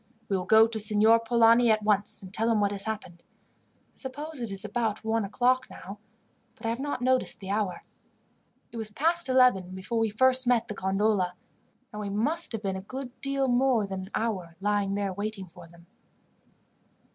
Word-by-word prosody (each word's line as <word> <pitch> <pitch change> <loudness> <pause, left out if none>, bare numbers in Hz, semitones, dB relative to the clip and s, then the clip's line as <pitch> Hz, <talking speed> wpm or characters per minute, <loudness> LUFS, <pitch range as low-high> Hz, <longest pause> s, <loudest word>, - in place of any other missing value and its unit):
"We 195 - +1
will 180 -1 -2
go 220 0 +7
to 225 -1 -3
Signor 215 +2 +5
Polani 230 +1 +4
at 215 -1 +2
once 205 -1 0
and 190 0 -11
tell 225 +2 +1
him 225 -2 +2
what 205 -1 +1
has 200 -1 -5
happened. 205 -6 -6 0.7
I - - -33
suppose 290 +2 -6
it 235 - -3
is 195 +1 -5
about 220 0 -2
one 225 0 0
o'clock 250 +6 +1
now, 200 +2 -10 0.6
but 225 - -12
I - - 0
have 230 +2 -2
not 285 -2 -3
noticed 255 0 +1
the 195 -1 -6
hour. 205 -3 -2 0.9
It 235 - -9
was 220 -1 -3
past 320 +8 +1
eleven 250 -8 +3
before 190 +5 -3
we 225 -1 +1
first 255 +4 +3
met 235 -2 +2
the - - -3
gondola, 195 -1 0 0.6
and 210 - -6
we 205 - -4
must 280 +12 0
have 220 -1 -4
been 190 -1 -2
a - - -6
good 255 +5 -7
deal 275 -1 +1
more 245 -3 +2
than 190 -1 -5
an 190 - -9
hour 190 -7 -3
lying 205 -1 0
there 200 -2 -2
waiting 205 0 -5
for 165 - -14
them." 170 0 -19
220 Hz, 195 wpm, -27 LUFS, 200-245 Hz, 0.9 s, go